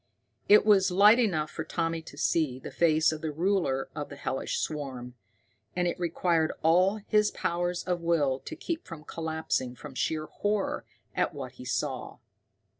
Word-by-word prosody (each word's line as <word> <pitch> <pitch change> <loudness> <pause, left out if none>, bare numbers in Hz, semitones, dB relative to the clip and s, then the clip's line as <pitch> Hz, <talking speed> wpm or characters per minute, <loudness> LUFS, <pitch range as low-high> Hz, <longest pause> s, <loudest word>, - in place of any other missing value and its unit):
It 210 +1 +7
was 200 -3 +5
light 205 +6 +6
enough 160 -10 +1
for 160 - -4
Tommy 165 0 -2
to 160 - -13
see 150 -7 +1
the 130 - -8
face 160 -1 +3
of 155 -1 -5
the 160 - -2
ruler 165 -5 0
of 145 - -4
the 145 - -8
hellish 135 -1 -3
swarm. 130 -5 -4 0.6
And 180 0 +1
it 175 - -2
required 170 -1 +1
all 180 +5 +4
his 210 -1 +3
powers 175 -2 -2
of 180 -2 -1
will 150 -6 +1
to 320 - -8
keep 335 +1 -4
from 165 -3 -9
collapsing 160 -6 -2
from 140 +3 -10
sheer 155 +4 -1
horror 205 +5 -2 0.3
at - - 0
what - - -6
he - - -12
saw. - - -3
165 Hz, 170 wpm, -28 LUFS, 150-185 Hz, 0.6 s, It